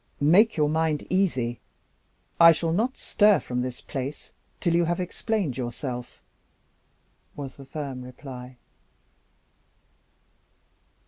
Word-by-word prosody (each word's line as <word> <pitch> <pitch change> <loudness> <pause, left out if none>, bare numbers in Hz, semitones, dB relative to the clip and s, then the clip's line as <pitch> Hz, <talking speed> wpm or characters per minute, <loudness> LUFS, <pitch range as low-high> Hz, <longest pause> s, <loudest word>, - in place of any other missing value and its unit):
"Make 180 +9 +5
your 150 -1 +3
mind 155 -1 0
easy. 130 -11 +1 0.8
I 165 0 +9
shall 165 +1 -1
not 230 +10 0
stir 205 -4 +4
from 125 -2 -3
this 125 -1 -5
place 135 +2 -6 0.3
till 170 -3 +1
you 170 0 +3
have 175 +1 -1
explained 180 - -2
yourself," 125 0 -5 1.1
was 135 -2 -7
the 135 - -11
firm 140 -3 -5
reply. 125 0 -10
150 Hz, 110 wpm, -26 LUFS, 130-175 Hz, 1.1 s, I